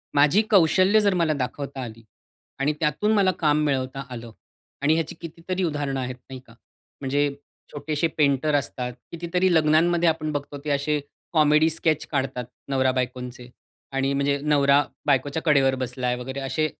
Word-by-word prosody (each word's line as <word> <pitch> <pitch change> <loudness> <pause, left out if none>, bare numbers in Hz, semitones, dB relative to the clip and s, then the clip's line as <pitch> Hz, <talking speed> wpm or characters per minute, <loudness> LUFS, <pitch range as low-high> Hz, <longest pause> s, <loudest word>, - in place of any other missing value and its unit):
माझी 150 +8 +5
कौशल्य 190 +3 +5
जर 200 -2 +3
मला 170 -3 +2
दाखवता 135 0 -4
आली 115 -1 -9 0.6
आणि 145 +2 +1
त्यातून 165 +8 +1
मला 195 -3 +4
काम 150 -1 +2
मिळवता 135 -1 -1
आलं. 115 -2 -8 0.5
आणि 150 +2 +3
ह्याची 160 -1 -2
कितीतरी 170 +3 -4
उदाहरणं 145 -5 -2
आहेत 125 0 -4
नाही 130 -1 -7
का? 115 - -16 0.5
म्हणजे 145 +1 +1 0.4
छोटेशे 150 +2 -1
पेंटर 145 0 +2
असतात. 125 -3 -2 0.2
कितीतरी 175 +2 0
लग्नांमध्ये 165 +2 +3
आपण 155 -1 -2
बघतो 145 0 -5
ते 150 - -2
असे 145 +1 0 0.3
कॉमेडी 155 0 +4
स्केच 160 -1 0
काढतात 130 -4 -2 0.2
नवरा 130 -1 +2
बायकोंचे 125 -1 -4 0.4
आणि 135 0 0
म्हणजे 140 0 +1
नवरा 145 -1 +4 0.2
बायकोच्या 145 +2 +1
कडेवर 135 -3 +4
बसलाय 125 0 -2
वगैरे 130 +2 -6
असे 135 +3 -1
145 Hz, 150 wpm, -24 LUFS, 135-160 Hz, 0.6 s, माझी